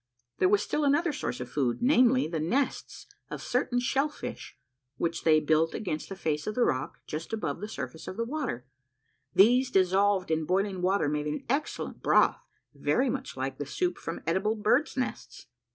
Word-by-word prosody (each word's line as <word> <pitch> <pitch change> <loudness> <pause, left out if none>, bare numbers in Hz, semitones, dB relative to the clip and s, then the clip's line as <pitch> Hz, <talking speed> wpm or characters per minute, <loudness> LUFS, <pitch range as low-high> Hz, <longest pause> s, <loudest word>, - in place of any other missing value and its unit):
There 185 - +4
was 205 0 +3
still 300 - -1
another 295 +3 +2
source 125 - -3
of 125 0 -6
food; 130 -5 0
namely, 255 0 +4
the 160 0 -3
nests 245 - -2 0.2
of - - -5
certain 245 0 0
shell 270 +4 +1
fish, - - -8 0.4
which 170 0 -2
they 155 -1 +5
built 155 +2 +2
against 165 -7 -4
the 195 - -5
face 155 -5 -2
of 215 - -2
the 250 - +3
rock, 130 - -1
just 160 +7 -6
above 220 - -3
the 210 - -4
surface 160 -6 -7
of 185 - -6
the 230 - -1
river. 255 - -3 0.7
These 245 +6 +5
dissolved 190 -2 +2
in 160 0 +1
boiling 190 +2 0
water 185 -3 +2
made 150 0 -1
an 150 - -4
excellent 280 +5 -2
broth, - - +3 0.3
very 255 0 +1
much 270 - -5
like 130 0 -3
the 145 - -3
soup 180 0 -1
from 165 - -6
edible 190 +7 +1
birds' 235 +8 +1
nests. 255 - -4
195 Hz, 185 wpm, -28 LUFS, 160-250 Hz, 0.7 s, they